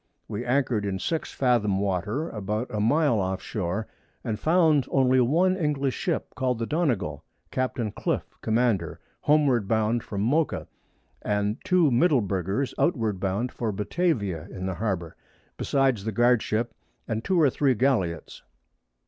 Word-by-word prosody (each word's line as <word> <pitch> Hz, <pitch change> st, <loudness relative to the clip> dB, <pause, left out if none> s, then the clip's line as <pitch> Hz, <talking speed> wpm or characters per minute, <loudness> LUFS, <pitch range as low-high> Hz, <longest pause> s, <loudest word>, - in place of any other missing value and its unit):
We 110 Hz, +2 st, -4 dB
anchor'd 125 Hz, -3 st, +1 dB
in 100 Hz, -2 st, -2 dB
6 160 Hz, -, -2 dB
Fathom 115 Hz, -7 st, +1 dB
Water, 100 Hz, -, -1 dB
about 105 Hz, +3 st, -3 dB
a 105 Hz, -, -1 dB
Mile 120 Hz, +2 st, +3 dB
off 95 Hz, 0 st, -1 dB
Shoar, 100 Hz, +2 st, -3 dB, 0.4 s
and 110 Hz, -1 st, -3 dB
found 160 Hz, -5 st, +3 dB
only 130 Hz, -1 st, +3 dB
one 170 Hz, +9 st, +3 dB
English 145 Hz, -6 st, 0 dB
Ship, -, -, -2 dB
call'd 130 Hz, -2 st, -1 dB
the 115 Hz, -, -2 dB
Donegal, 115 Hz, -, -1 dB, 0.3 s
Capt. 130 Hz, +1 st, -2 dB
Cliff -, -, -1 dB, 0.2 s
Commander, 110 Hz, -6 st, 0 dB, 0.2 s
homeward 140 Hz, -8 st, +3 dB
bound 110 Hz, +2 st, +1 dB
from 100 Hz, -2 st, -4 dB
Mocha, 145 Hz, +9 st, 0 dB, 0.5 s
and 105 Hz, +2 st, -1 dB
2 175 Hz, -6 st, +4 dB
Middleburgers 120 Hz, -, +1 dB
outward 110 Hz, -, +1 dB
bound 100 Hz, +6 st, -1 dB
for 115 Hz, -3 st, -2 dB
Batavia 105 Hz, -, -1 dB
in 95 Hz, -, -6 dB
the 95 Hz, -, -1 dB
Harbour, 90 Hz, -5 st, -3 dB, 0.4 s
besides 135 Hz, -7 st, +1 dB
the 110 Hz, -, -2 dB
Guard 120 Hz, +2 st, +3 dB
Ship, 115 Hz, +1 st, -1 dB, 0.3 s
and 110 Hz, 0 st, -2 dB
2 185 Hz, -2 st, +1 dB
or 145 Hz, -5 st, +5 dB
3 135 Hz, -1 st, +2 dB
Galliots. 105 Hz, -10 st, 0 dB
115 Hz, 145 wpm, -26 LUFS, 100-135 Hz, 0.5 s, or